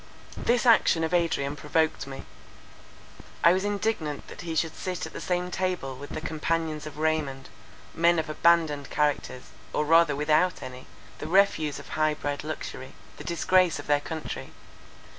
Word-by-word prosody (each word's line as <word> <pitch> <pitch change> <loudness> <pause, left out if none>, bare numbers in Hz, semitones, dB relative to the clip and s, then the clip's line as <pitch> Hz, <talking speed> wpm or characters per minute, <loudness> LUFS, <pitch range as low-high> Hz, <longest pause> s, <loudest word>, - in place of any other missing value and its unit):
This 240 +1 +2
action 220 -8 +5
of 160 - -1
Adrian 160 -5 +1
provoked 155 0 0
me. 135 0 -7 1.2
I 170 - +7
was 190 +1 0
indignant 205 -7 -2
that - - -9
he 165 -2 -4
should 160 0 0
sit 185 -1 -4
at - - -9
the - - -6
same 180 0 -1
table 180 -8 -2
with 145 +2 -9
the - - -5
companions 160 -1 -2
of 150 - -9
Raymond—men 155 +1 -1
of 160 - -1
abandoned 155 -3 +2
characters, 145 -3 -1 0.2
or 150 - +1
rather 165 -1 +5
without 155 +5 +2
any, 130 0 -9 0.3
the - - -5
refuse 160 -5 +3
of - - -11
high 155 -1 +1
bred 145 -1 -3
luxury, 150 -4 -6 0.2
the - - -8
disgrace 180 0 +2
of 145 - -8
their 145 -1 +2
country. 160 +1 -6
160 Hz, 160 wpm, -27 LUFS, 145-170 Hz, 1.2 s, I